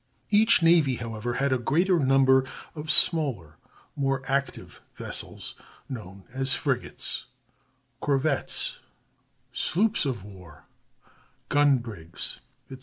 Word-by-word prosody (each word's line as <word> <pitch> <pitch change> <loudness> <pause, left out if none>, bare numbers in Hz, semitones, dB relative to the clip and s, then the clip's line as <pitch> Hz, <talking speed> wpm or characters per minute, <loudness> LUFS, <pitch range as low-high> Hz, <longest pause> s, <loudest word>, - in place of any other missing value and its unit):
Each 215 -3 +5
navy, 165 -6 +4
however, 115 0 -5
had 140 0 +1
a 130 - 0
greater 170 +9 +2
number 130 -1 +4 0.3
of 155 0 -8
smaller, 145 - +2 0.4
more 135 -2 -1
active 140 +1 -3
vessels, - - -3 0.3
known 100 -7 -9
as 135 0 +1
frigates, - - 0 0.7
corvettes, 140 0 0 0.7
sloops 205 -2 +1
of 120 -8 -4
war, 90 -8 -14 0.8
gun 145 -2 +4
brigs, 105 -9 -6 0.3
etc. 130 - -9
135 Hz, 105 wpm, -26 LUFS, 115-150 Hz, 0.8 s, Each